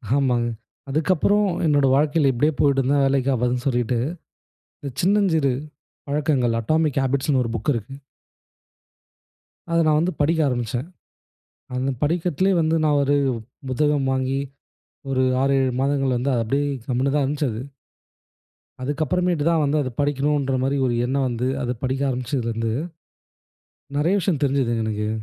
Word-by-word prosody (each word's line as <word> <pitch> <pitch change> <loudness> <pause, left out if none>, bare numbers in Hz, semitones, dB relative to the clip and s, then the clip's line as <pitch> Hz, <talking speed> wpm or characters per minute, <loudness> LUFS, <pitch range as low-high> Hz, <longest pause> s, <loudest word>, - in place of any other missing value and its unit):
ஆமாங்க. 125 -4 +1 0.4
அதுக்கப்புறம் 185 +7 +2 0.2
என்னுடைய 145 -3 +3
வாழ்க்கையில 145 0 +3
இப்படியே 150 +6 +1
போய்ட்டு 140 -2 +3
இருந்தா 140 +3 +1
வேலைக்கு 135 0 +1
ஆவாதுனு 125 +1 -1
சொல்லிட்டு, 120 -2 0 1.0
சின்னஞ்சிறு 175 -8 +2 0.6
பழக்கங்கள் 140 -5 +1
அடாமிக் 155 +2 +1
ஹேபிட்ஸ்ன்னு 135 +2 0
ன்னு 125 - +3
ஒரு 115 - -3
புக் 115 +6 -1
இருக்கு. 115 +4 -5 1.8
அத 170 - +3
நா - - +4
வந்து 175 +3 +1
படிக்க 160 +3 +2
ஆரம்பிச்சேன். 120 +2 -2 0.9
அந்த 130 +2 -1
படிக்கட்டிலே 175 +4 +1
வந்து 160 +1 +1
நா - - +3
ஒரு 140 +1 +2 0.5
புத்தகம் 145 0 +1
வாங்கி, 130 +1 0 0.7
ஒரு 130 -1 +1 0.2
6, 135 0 +2
7 130 -1 0
மாதங்கள் 135 -2 +1
வந்து 130 +3 -1
அது 115 - +1
அப்படியே, 140 +6 0 0.2
கம்முன்னு 130 +2 0
தான் 145 -2 +2
இருந்துச்சு 145 0 -1
அது. 110 +3 -5 1.2
அதுக்கு 145 +4 -1
அப்புறமேட்டு 175 0 0
தான் 165 -2 +3
வந்து 145 +1 +1
அத 130 - -2
படிக்கணும்ன்றமாரி 140 -2 0
ஒரு 120 - +1
எண்ணம் 135 +1 0
வந்து, 125 +1 -2
அத 125 0 -1
படிக்க 130 +1 -1
ஆரம்பிச்சதுலருந்து, 115 -3 -2 1.2
நெறைய 165 +6 +2
விஷயம் 170 -5 0
தெரிஞ்சதுங்க 130 -5 +1
எனக்கு. 105 0 -2
135 Hz, 135 wpm, -22 LUFS, 125-150 Hz, 1.8 s, நா